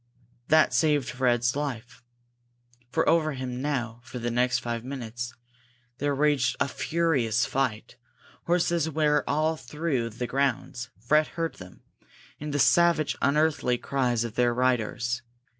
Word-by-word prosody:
That 155 0 +4
saved 145 -5 +2
Fred's 120 -1 +1
life. 125 -5 -5 0.9
For - - 0
over 155 -2 +3
him 130 -1 -5
now, 120 -5 -2
for 130 0 -8
the 120 0 -2
next 125 +1 +2
five 115 -1 -4
minutes, 120 -2 -5 0.7
there 145 0 0
raged 140 -4 +2
a 140 - +2
furious 140 -8 +1
fight. 125 -5 -2 0.5
Horses 170 -2 +2
were 150 -1 +2
all 155 +2 +1
through 135 -3 -2
the 115 +3 -5
grounds; 130 -1 -1
Fred 150 +7 +3
heard 165 -1 -2
them, 90 -1 -13 0.6
and 150 0 -5
the 145 - 0
savage, 170 +1 +4
unearthly 145 -3 +2
cries 125 -3 0
of 115 -2 -5
their 120 0 +2
riders. 120 -1 0
130 Hz, 135 wpm, -27 LUFS, 120-150 Hz, 0.9 s, That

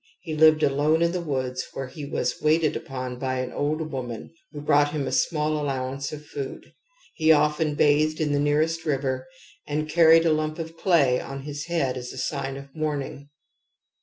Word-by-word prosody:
He 160 - -5
lived 155 0 +5
alone 150 +4 +3
in 170 - +2
the 180 0 -2
woods, 130 -5 -2
where 135 - -4
he 140 +3 -8
was 125 -3 -2
waited 155 0 +2
upon 130 -5 -5
by 130 -1 -1
an 130 0 -3
old 155 +2 -2
woman 125 -1 -6 0.2
who 150 - -7
brought 145 0 +3
him 145 -3 -1
a - - -3
small 150 +3 +1
allowance 135 -1 -3
of 150 0 -8
food; 140 -2 -7 0.4
he 160 -1 +3
often 150 0 +2
bathed 150 +1 +3
in 155 -2 0
the 145 - +1
nearest 155 +3 +1
river, 135 -4 -1 0.4
and 150 +1 -2
carried 165 +1 +6
a 160 - +4
lump 155 +1 -1
of 165 -1 -6
clay 155 -8 +3
on 135 0 -7
his 145 +1 -6
head 140 -7 0
as 125 0 -6
a - - -10
sign 135 0 -3
of 140 0 -12
mourning. 145 -2 -3
145 Hz, 190 wpm, -25 LUFS, 135-155 Hz, 0.4 s, carried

